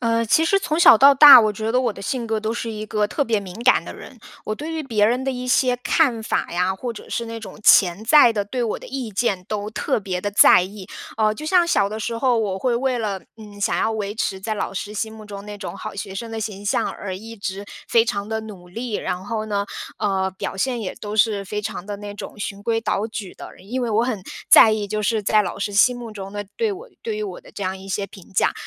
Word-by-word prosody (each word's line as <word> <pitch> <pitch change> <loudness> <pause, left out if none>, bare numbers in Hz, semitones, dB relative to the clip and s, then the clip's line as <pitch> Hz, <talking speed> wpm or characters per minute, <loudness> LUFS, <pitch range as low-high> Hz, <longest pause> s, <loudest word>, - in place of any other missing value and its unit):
呃， 230 -1 +1
其 315 +8 +3
实 395 +4 +3
从 315 -4 -2
小 290 -9 +8
到 275 +3 +8
大， 285 -1 +11
我 215 -1 +2
觉 220 +2 -3
得 250 - +3
我 245 -2 0
的 205 - -9
性 245 +1 -3
格 220 -1 -1
都 220 +1 -2
是 235 -1 -4
一 215 -1 -5
个 210 0 0
特 285 +7 -1
别 225 -4 0
敏 185 -3 -9
感 255 - +5
的 - - -9
人。 - - -12 0.3
我 215 - -2
对 300 +9 -6
于 320 -1 -3
别 220 -7 +2
人 245 +4 0
的 270 - 0
一 250 0 -5
些 250 -1 +3
看 250 -3 +1
法 220 - -2
呀， 180 +2 0
或 240 +4 -4
者 215 - -12
是 235 - -2
那 230 0 -7
种 220 - -10
潜 190 +2 +5
在 285 +1 +7
的、 210 -3 -1
对 245 +4 -3
我 230 - -2
的 - - -12
意 255 -4 -5
见 195 -2 -1
都 210 0 -3
特 220 - -1
别 190 -3 -4
地 205 - -2
在 205 - +7
意。 190 +1 -8 0.3
呃， 215 -1 +2
就 305 - -8
像 350 0 +4
小 200 -11 +2
的 215 +1 -5
时 230 +1 -3
候， 250 -3 +2
我 200 -4 -1
会 240 +2 0
为 255 0 0
了， 205 -4 -3 0.2
嗯， 210 -2 -12
想 205 - 0
要 220 - +1
维 210 -2 -3
持 195 -3 -2
在 215 +3 -3
老 210 - -3
师 205 +2 -5
心 220 +1 -3
目 215 -1 -11
中 200 -1 -9
那 210 0 -7
种 200 - -7
好 - - -7
学 195 -1 -6
生 225 +4 -6
的 225 - -5
形 205 -2 -5
象， 200 - +1
而 190 -2 -6
一 225 +4 -10
直 200 -2 -5 0.2
非 230 -1 +4
常 200 -3 -3
地 220 0 -3
努 195 -5 -11
力。 230 +6 -6
然 180 +1 -4
后 220 +1 -3
呢， 200 -1 -1 0.3
呃， 190 -2 0
表 190 - -5
现 245 +2 -1
也 185 - -4
都 210 0 -6
是 210 -2 +2
非 210 +2 -5
常 205 -3 -5
的 205 -1 -5
那 205 0 -8
种 205 - -9
循 200 0 -5
规 225 +1 0
蹈 215 0 -1
矩 205 -4 -7
的。 - - -10
然 185 - -18
因 250 +5 -3
为 240 - -1
我 225 +1 +2
很 225 -7 -3 0.3
在 220 - +9
意， 210 -1 -2
就 210 +1 -3
是， 215 0 0
在 215 +2 +3
老 195 -2 -3
师 205 +1 -3
心 245 +5 +4
目 235 -2 -8
中 195 -2 -8
的 205 0 -4
对 455 -2 +1
我 410 +6 -8
对 445 -2 -3
于 430 - -3
我 420 +4 -6
的 - - -16
这 - - -8
样 190 0 -3
一 190 +1 -12
些 195 +1 -2
评 190 -1 -15
价。 - - +2
215 Hz, 290 characters per minute, -22 LUFS, 200-235 Hz, 0.3 s, 大